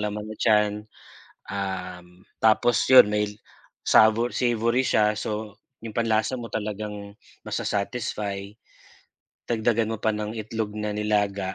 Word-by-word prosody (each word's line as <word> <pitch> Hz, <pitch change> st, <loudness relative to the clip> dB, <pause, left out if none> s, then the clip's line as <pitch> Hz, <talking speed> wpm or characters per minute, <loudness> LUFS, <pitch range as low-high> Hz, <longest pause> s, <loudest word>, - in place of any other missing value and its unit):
laman 105 Hz, 0 st, -3 dB
na 110 Hz, -, -8 dB
tyan, 105 Hz, -2 st, +3 dB, 0.8 s
um, 90 Hz, -2 st, -6 dB, 0.2 s
tapos 110 Hz, +1 st, +4 dB, 0.2 s
yun 130 Hz, -, +10 dB
may 105 Hz, 0 st, +1 dB, 0.6 s
sa 110 Hz, -, +7 dB, 0.2 s
savory 120 Hz, +1 st, +1 dB
siya, 105 Hz, -4 st, +3 dB
so, 105 Hz, -1 st, -4 dB, 0.3 s
yung 115 Hz, -, -6 dB
panlasa 115 Hz, +2 st, 0 dB
mo 115 Hz, -, -7 dB
talagang 105 Hz, -1 st, -5 dB, 0.3 s
ma-sasatisfy. 100 Hz, -1 st, -3 dB, 0.9 s
Dagdagan 115 Hz, -1 st, 0 dB
mo 110 Hz, -, -8 dB
pa 110 Hz, -, +2 dB
ng 105 Hz, 0 st, -4 dB
itlog 110 Hz, -1 st, -4 dB
na 105 Hz, 0 st, -3 dB
nilaga 105 Hz, -2 st, -1 dB
105 Hz, 120 wpm, -25 LUFS, 105-110 Hz, 0.9 s, yun